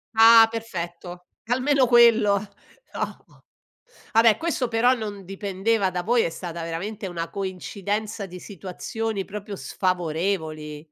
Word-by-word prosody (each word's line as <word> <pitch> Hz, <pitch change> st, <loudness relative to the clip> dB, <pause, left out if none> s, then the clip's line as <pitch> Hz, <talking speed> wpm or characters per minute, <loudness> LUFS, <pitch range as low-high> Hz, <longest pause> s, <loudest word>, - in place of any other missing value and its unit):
Ah, 225 Hz, 0 st, +8 dB
perfetto 180 Hz, -5 st, -6 dB, 0.2 s
almeno 260 Hz, +1 st, +3 dB
quello, 230 Hz, -4 st, +6 dB, 0.6 s
no. -, -, -7 dB, 0.7 s
A 225 Hz, -, +6 dB
beh 225 Hz, -2 st, +5 dB
questo 325 Hz, -6 st, -1 dB
però 235 Hz, +2 st, +3 dB
non 205 Hz, -5 st, -6 dB
dipendeva 195 Hz, +2 st, -1 dB
da 180 Hz, -1 st, -2 dB
voi, 235 Hz, +2 st, +3 dB
è -, -, 0 dB
stata 170 Hz, 0 st, -6 dB
veramente 195 Hz, +6 st, -5 dB
una 170 Hz, -2 st, -4 dB
coincidenza 200 Hz, +2 st, -4 dB
di 180 Hz, 0 st, -10 dB
situazioni 200 Hz, +2 st, -5 dB
proprio 205 Hz, 0 st, -7 dB
sfavorevoli. 160 Hz, -5 st, -2 dB
200 Hz, 120 wpm, -24 LUFS, 180-225 Hz, 0.7 s, Ah